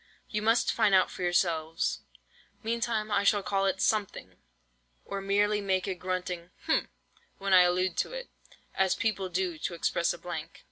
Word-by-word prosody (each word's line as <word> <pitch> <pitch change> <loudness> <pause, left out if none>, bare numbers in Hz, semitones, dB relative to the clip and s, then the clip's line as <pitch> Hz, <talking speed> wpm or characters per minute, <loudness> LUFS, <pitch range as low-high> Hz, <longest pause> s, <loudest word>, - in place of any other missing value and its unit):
You 210 - -1
must 225 +2 +3
find 210 -4 +4
out 185 - +4
for - - -8
yourselves. 165 -2 0 0.6
Meantime 225 -1 -1
I 200 - +2
shall 205 0 +3
call 195 0 +1
it 190 - 0
something, 200 - -1 0.7
or 195 - -4
merely 205 +2 +2
make 190 -2 0
a 195 - -1
grunting—hm—when 185 - -4
I 185 - +9
allude 180 0 +2
to - - 0
it, - - -6 0.5
as 190 -1 +2
people 195 -4 -1
do 180 -2 -2
to 170 - -3
express 170 0 +1
a - - -5
blank." 165 -2 -7
190 Hz, 155 wpm, -29 LUFS, 180-210 Hz, 0.7 s, I